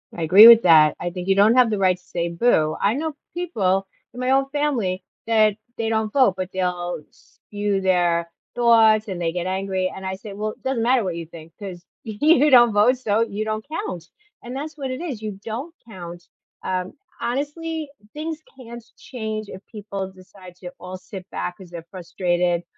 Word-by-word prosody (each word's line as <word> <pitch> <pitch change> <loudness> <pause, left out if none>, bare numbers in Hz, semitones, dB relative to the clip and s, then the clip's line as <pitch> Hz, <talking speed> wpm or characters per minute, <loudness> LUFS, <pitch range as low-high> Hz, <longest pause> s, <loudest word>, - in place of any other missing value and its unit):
I 170 - -6
agree 195 +8 +9
with 230 -1 +10
that, 155 -3 +6
I 175 - -3
think 180 +1 -7
you 195 - +3
don't 210 +4 +5
have 250 -3 +5
the 210 - 0
right 185 -1 +3
to 180 - -27
say 170 -1 -3
boo. 170 -4 +2
I 205 +3 +2
know 310 +2 -3 0.2
people 195 - -1 0.3
in 250 - -9
my 255 0 -1
own 270 0 +3
family 245 -11 -1 0.2
that 215 -2 +3 0.2
they 225 -1 -1
don't 220 -1 -1
vote, 255 -9 +4
but 185 0 -4
they'll 175 -2 -2
spew 205 -1 -4
their 175 -2 +1 0.3
thoughts 225 -2 +4
and 185 -3 -5
they 165 -1 -1
get 180 +1 -3
angry, 190 -1 -2
and 190 0 -8
I 190 0 -3
say, 200 +1 -10
“Well, 215 +1 -3
it - - -18
doesn't 260 -4 -1
matter 245 -1 +3
what 180 -3 -3
you 170 -1 -6
think 165 0 -13
'cause 185 -3 -8 0.2
you 295 +7 +3
don't 240 -3 +7
vote 235 +5 +4
so 220 -3 0
you 215 -2 -2
don't 215 0 -3
count,” 310 - -5 0.4
and 245 +2 -7
that's 305 +2 -6
what 265 -2 -4
it 255 - -5
is, 270 -11 -5
you 210 -3 -6
don't 250 +9 -6
count. 175 -4 -10 0.4
Um, 185 0 -3 0.3
honestly, 295 +4 -3 0.2
things 315 +1 -5 0.2
can't 235 -1 -10
change 220 -4 -6
if 190 - -10
people 200 -3 -6
decide 185 -1 -15
to 180 -1 -9
all 185 +1 -8
sit 190 -1 -10
back 180 - -4
'cause 185 -3 -14
they're 170 -2 -8
frustrated, 175 -1 -1
205 Hz, 200 wpm, -22 LUFS, 180-240 Hz, 0.4 s, with